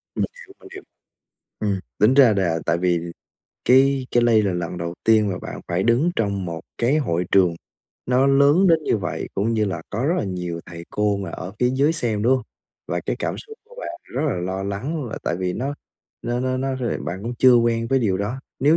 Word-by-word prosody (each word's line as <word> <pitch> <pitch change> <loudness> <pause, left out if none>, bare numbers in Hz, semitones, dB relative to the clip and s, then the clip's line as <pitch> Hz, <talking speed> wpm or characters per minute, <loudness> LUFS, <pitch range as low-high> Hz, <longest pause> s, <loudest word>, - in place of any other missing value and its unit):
Mình - - +1 0.2
hiểu, 385 - -15
mình - - -14
hiểu. 385 0 -9 0.8
Ừm, 100 -3 0 0.2
tính 110 +5 +5
ra 130 -6 +6
là 85 -4 +1
tại 85 0 +2
vì 90 -1 +1 0.7
cái 135 0 +4
cái 120 - +3
lây 115 -2 +5
là 100 -3 0
lần 90 0 -3
đầu 85 0 -4
tiên 110 -2 +4
mà 90 - -2
bạn - - -7
phải 85 +2 0
đứng 120 - +3
trong 100 -4 -1
một 85 -2 -5 0.2
cái 125 +6 +2
hội 90 - 0
trường 90 -3 +4 0.5
nó 125 +2 +3
lớn 140 +7 +5
đến 165 -3 +5
như - - +2
vậy, 100 - -4
cũng 105 +4 0
như 110 -1 +2
là 90 -5 -3
có 115 +5 -2
rất 165 +5 +2
là - - -1
nhiều 90 -3 -4
thầy 85 -1 -9
cô 105 -1 +1
mà 95 -3 -5
ở 90 +2 -7
phía 125 0 +2
dưới 140 +4 +3
xem, 115 -9 -1
đúng 125 +4 +4
hông? 130 - -5 0.5
Và - - -1
cái - - -1
cảm - - -2
xúc 440 0 -11
của 485 +2 -18
bạn 335 - -5
rất 135 - -4
là 140 - 0
lo 95 +2 -3
lắng 130 +11 -3
là 110 - -6
tại - - -1
vì 90 0 -2
nó 135 +8 -3 0.5
nó 120 +1 -1
nó 130 0 0
nó 135 +1 -1
rồi 125 -3 -2
bạn 95 +3 -5
cũng 120 +3 -4
chưa 130 -1 +7
quen 115 -1 +2
với 135 - +3
điều 105 -7 +1
đó, 110 +7 -3 0.2
nếu 150 +5 +5
115 Hz, 235 wpm, -22 LUFS, 95-130 Hz, 0.8 s, chưa